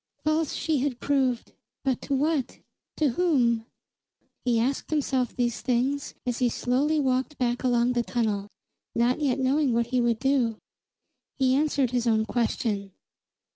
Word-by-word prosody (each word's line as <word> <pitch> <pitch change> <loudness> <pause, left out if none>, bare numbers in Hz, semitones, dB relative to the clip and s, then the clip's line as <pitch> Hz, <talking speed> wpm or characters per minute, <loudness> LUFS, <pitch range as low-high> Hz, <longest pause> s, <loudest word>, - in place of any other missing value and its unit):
False 310 0 +1
she 315 -4 0
had 255 -2 -1
proved, 265 -4 0 0.3
but 265 -3 0
to 280 - -1
what? 290 -1 0 0.4
To 305 -3 +3
whom? 240 -7 +2 0.8
He 240 -2 +2
asked 265 +4 -1
himself 265 -5 0
these 240 -2 -1
things 260 +3 0
as 245 -1 -2
he 250 -2 +3
slowly 275 +7 +1
walked 265 +1 0
back 245 -1 0
along 245 -1 +2
the 240 - +1
tunnel, 205 -1 -1 0.5
not 240 +4 +2
yet 270 -3 +1
knowing 270 0 +2
what 235 0 +2
he 250 - +3
would 235 -1 +2
do. 255 -3 +1 0.8
He 260 -2 +3
answered 280 -3 +1
his 245 -1 0
own 220 -1 +3
question. 215 -4 -1
250 Hz, 150 wpm, -26 LUFS, 235-280 Hz, 0.8 s, To